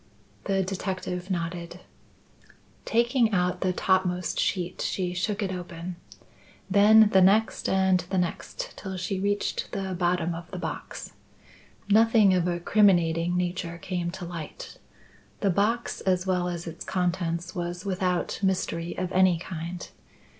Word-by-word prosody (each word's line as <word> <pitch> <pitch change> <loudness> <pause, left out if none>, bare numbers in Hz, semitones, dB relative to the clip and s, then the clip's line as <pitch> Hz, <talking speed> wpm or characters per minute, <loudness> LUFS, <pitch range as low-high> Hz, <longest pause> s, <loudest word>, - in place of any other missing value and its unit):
The 195 -1 +1
detective 185 -1 -4
nodded. 170 0 -4 1.0
Taking 235 -1 +2
out 180 -1 +1
the 185 - +2
topmost 180 -1 +1
sheet, 180 -2 -1
she 180 -2 -1
shook 200 +3 -1
it 190 - -2
open. 175 -1 -6 0.7
Then 210 +2 +7
the 190 - +7
next 205 +4 +3
and 190 -1 +3
the 190 - -1
next - - -3
till 190 -2 -6
she 185 +2 -2
reached 205 +1 -1
the 190 -1 -2
bottom 175 -1 0
of 165 0 -8
the 185 - -6
box. 180 - -6 0.7
Nothing 220 -1 +5
of 180 -1 +2
a 175 -1 -1
criminating 175 -3 +3
nature 175 -1 -2
came 180 -2 -3
to 185 -1 -6
light. 170 -3 -8 0.6
The 200 - +3
box 220 +6 0
as 185 -1 +1
well 180 -1 +1
as 175 -1 -4
its 165 -1 -7
contents 175 -1 -1
was 175 +1 -4
without 185 -2 -1
mystery 175 -3 -1
of 185 0 -2
any 185 -2 +4
kind. 170 +1 -6
185 Hz, 140 wpm, -27 LUFS, 175-195 Hz, 1.0 s, Then